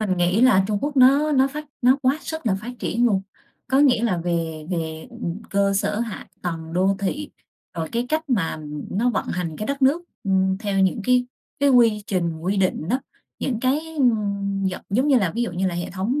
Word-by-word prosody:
Mình 190 -4 0
nghĩ 180 +5 +2
là 220 -7 +5
Trung 210 -1 0
Quốc 290 0 -3
nó 275 +4 +5
nó 270 -1 +4
phát 300 +2 -6 0.2
nó 255 +2 +5
quá 265 +4 +2
sức 320 -4 -6
là 205 - +3
phát 240 +3 -6
triển 235 +3 +1
luôn. 195 -4 +1 0.5
Có 265 +2 +3
nghĩa 255 -5 +4
là 190 -7 +1
về 165 -2 -2
về, 160 -2 -3
ừm, 220 -4 -5
cơ 200 0 +2
sở 205 +2 0
hạ 230 -4 -5 0.2
tầng 165 -2 -4
đô 190 +3 +2
thị, 285 +10 -3 0.4
rồi 165 -2 -3
cái 235 +1 -1
cách 315 +1 -1
mà 185 -10 0 0.3
nó 240 +5 +1
vận - - -2
hành 170 -3 -3
cái 215 - -4
đất 280 0 -2
nước, 290 +7 +4 0.2
ừm, 190 -1 +2
theo 200 -2 -1
những 190 +3 +2
cái 250 +1 +3 0.3
cái 285 - +4
quy 230 -5 +4
trình, 170 -5 -1
quy 190 +5 -1
định 185 -4 0
đó. 255 +5 +1 0.4
Những 240 -4 -2
cái, 265 +4 +2 0.2
ưm, 200 -5 +1
giận 190 -1 -2
giống 255 +8 +2
như 270 -4 +5
là, 190 -5 +1
ví 235 - 0
dụ 235 - -2
như 185 +2 -1
là 180 - -1
hệ 175 - -4
thống 205 +10 -1
210 Hz, 220 wpm, -23 LUFS, 185-255 Hz, 0.5 s, là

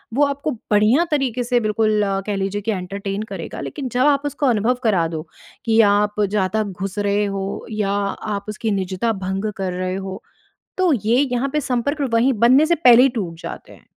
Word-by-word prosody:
वो 290 +2 +4
आपको 280 +2 -2 0.2
बढ़िया 215 +9 +4
तरीक़े 255 -4 0
से 245 0 +1
बिल्कुल 215 -1 +1 0.3
कह 205 - -1
लीजिए 195 +1 -2
कि 220 +2 -1
एंटरटेन 195 +1 -4
करेगा। - - -6
लेकिन 275 -4 -5
जब 245 +2 -1
आप 280 -1 +2
उसको 290 0 -2
अनुभव 235 0 +2
करा 185 -7 +2
दो 160 -1 -5 0.4
कि 225 -1 +3
आप 210 +1 +1
ज़्यादा 205 +1 0
घुस 195 0 -6
रहे 205 0 +1
हो 195 0 -4
या 210 -2 -1
आप 200 0 -3
उसकी 215 +1 -2
निज़ता 190 +3 -1
भंग 195 +3 -2
कर 185 -2 -2
रहे 185 +1 -2
हो, 190 0 -6 0.6
तो 370 -2 +3
ये 230 -1 +1
यहाँ 250 +3 0
पे 300 - +1
संपर्क 270 +4 -1
वहीं 245 +4 +3
बनने 265 +5 +6
से 340 +2 +2
पहले 250 -6 +7
ही 270 - +5
टूट 170 -7 -4
जाते - - -8
हैं। - - -19
215 Hz, 195 wpm, -20 LUFS, 195-250 Hz, 0.6 s, पहले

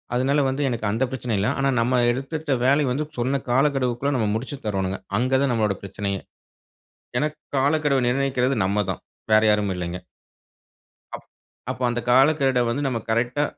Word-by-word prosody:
அதனால 135 +4 +2
வந்து 135 +2 -2
எனக்கு 115 -3 -3
அந்த 115 +5 0
பிரச்சனை 125 -3 -3
இல்லை. 100 - +1
ஆனா 135 0 +2
நம்ம 125 +1 +2
எடுத்துட்ட 140 +4 -3
வேலையை 140 +1 +3
வந்து 150 +4 -1
சொன்ன 130 +3 0
காலக்கெடுவுக்குள்ள 135 0 +1
நம்ம 110 - +1
முடிச்சு 130 +5 -4
தரோணும்ங்க. 95 -2 -2 0.2
அங்க 130 +2 0
தான் 140 - +1
நம்மளோட 105 -3 +1
பிரச்சனையே. 100 0 -3 1.0
எனக்கு 150 0 -2 0.2
காலக்கெடுவை 145 -1 +2
நிர்ணயிக்கிறது 130 0 +1
நம்ம 100 +2 +1
தான் - - -5 0.3
வேற 110 0 +6
யாரும் 105 -2 +1
இல்லைங்க. 90 0 -4 1.2
அப் - - -12 0.5
அப்ப - - -8
அந்த 120 0 -1
காலக்கெட 135 -1 +4
வந்து 130 +5 -1
நம்ம 120 -3 -1
கரெக்டா, 120 +5 +1
125 Hz, 155 wpm, -23 LUFS, 110-140 Hz, 1.2 s, வேற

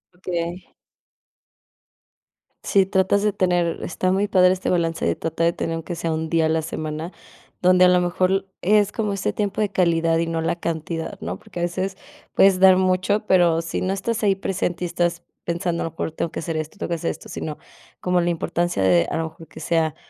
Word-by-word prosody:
Okey. 175 0 -4 1.9
Si 195 -1 +3
tratas 190 +1 +2
de 210 - +3
tener 175 -3 +1
está 185 +2 -1
muy 200 +2 +1
padre 185 -1 +5
este 185 - -3
balance 165 -2 0
de 85 - +1
tratar 165 +1 -2
de 170 - +1
tener 165 - -3
aunque 165 +1 -5
sea 165 0 -2
un 160 0 -3
día 165 -1 +2
a - - -1
la 160 0 +1
semana, 155 +2 -5 0.5
donde 185 0 +6
a - - +7
lo 180 0 +4
mejor 185 +2 +1
es 210 +1 +3
como 210 -3 -2
este 195 - -1
tiempo 205 0 -1
de 210 - +1
calidad 165 -3 +2
y 165 - 0
no 165 -1 -1
la 165 +1 -1
cantidad, 165 0 -4
¿no? 90 +3 -4
Porque 175 - -9
a - - -1
veces 185 +2 -2 0.4
puedes 195 -1 +5
dar 190 -1 +7
mucho, 185 +3 +1
pero 170 -3 +4
si 165 - -4
no 185 +1 0
estás 220 +3 -2
ahí 195 -2 +3
presente 180 -2 -2
y - - -1
estás 175 0 -1 0.2
pensando, 170 0 -1
a - - -2
lo 165 - -4
mejor 165 - -4
tengo 160 +1 -3
que - - -5
hacer 160 0 -3
esto, 155 +6 -5
tengo - - -4
que 170 - 0
hacer 165 0 -2
esto, - - -11
sino, 150 -1 -5 0.4
como 180 0 +1
la 175 - +1
importancia 175 - -1
de, 90 -3 +4
a - - -2
lo 165 - -1
mejor, 160 0 -15
que 160 - -12
sea 160 -1 +1
175 Hz, 215 wpm, -22 LUFS, 165-190 Hz, 1.9 s, a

